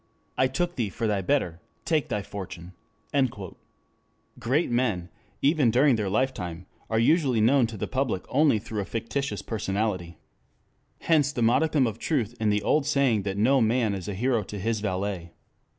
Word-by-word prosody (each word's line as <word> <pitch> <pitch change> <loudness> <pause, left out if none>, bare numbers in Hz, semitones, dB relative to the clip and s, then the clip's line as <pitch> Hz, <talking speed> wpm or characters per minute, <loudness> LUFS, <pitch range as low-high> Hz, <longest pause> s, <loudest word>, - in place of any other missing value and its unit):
I 130 - +3
took 175 +7 -2
thee 115 -5 0
for 115 +4 -4
thy 105 -3 +1
better; 90 - 0 0.3
take 155 -3 +1
thy 105 - -2
fortune." 95 -3 -8 0.4
2 120 -9 -1 0.8
Great 130 +5 0
men, 110 -8 0 0.3
even 145 -3 +4
during 130 +3 +4
their 105 -3 -1
lifetime, 95 -7 -2 0.2
are 110 - 0
usually 130 0 +3
known 120 +3 +4
to 110 -1 -8
the - - -2
public 130 -8 -2
only 145 -3 +3
through 105 0 -4
a - - -4
fictitious 125 +6 -3
personality. 100 -5 -2 0.8
Hence 150 -4 +3
the 120 -5 -1
modicum 140 +4 +3
of 115 -1 -3
truth 120 -8 -1
in 110 -1 +1
the 105 0 +1
old 150 -2 +2
saying 140 -7 +2
that 100 0 -3
no 130 +5 +4
man 115 -1 +2
is 95 -3 -5
a 100 - -3
hero 120 +2 +1
to 105 +1 -7
his 110 +3 -1
valet. 95 -3 -3
115 Hz, 170 wpm, -26 LUFS, 100-135 Hz, 0.8 s, even